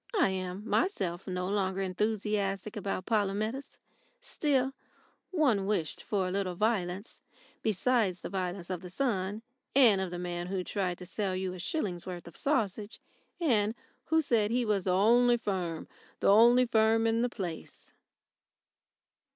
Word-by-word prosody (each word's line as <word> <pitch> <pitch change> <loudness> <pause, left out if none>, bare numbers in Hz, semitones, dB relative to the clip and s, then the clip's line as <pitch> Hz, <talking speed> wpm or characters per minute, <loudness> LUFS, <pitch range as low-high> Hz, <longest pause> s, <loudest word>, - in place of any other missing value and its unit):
I 345 - +4
am 190 +2 -4
myself 190 - 0
no 180 -1 -2
longer 195 -1 0
enthusiastic 205 +1 -1
about 195 -3 -3
Polumetis. 215 +5 -1 0.4
Still, 275 - 0 0.6
one 255 - +2
wished 170 -7 -1
for 195 -3 -1
a - - -3
little 190 -2 -1
violence 200 -1 -1 0.4
besides 215 -2 +1
the - - -5
violence 185 -1 -3
of 180 -2 -3
the 180 - -8
sun 205 -1 -1 0.3
and 230 -8 +6
of 190 - -2
the 175 - -5
man 175 0 -4
who 185 0 -2
tried 180 -2 -2
to 180 - -9
sell 195 0 -2
you 185 0 -2
a 185 - -8
shilling's 180 - -3
worth 175 -2 -6
of 170 - -11
sausage 215 -7 -1 0.4
and 225 - +2 0.3
who 320 0 +2
said 220 -6 +2
he 240 +1 +1
was 205 -4 0
"the 185 - +2
only 240 +6 +5
firm, 185 -7 -3 0.3
the - - +3
only 240 +5 +7
firm 225 -1 +3
in 225 0 +2
the 245 - +1
place." 180 -8 -7
200 Hz, 150 wpm, -30 LUFS, 185-230 Hz, 0.6 s, only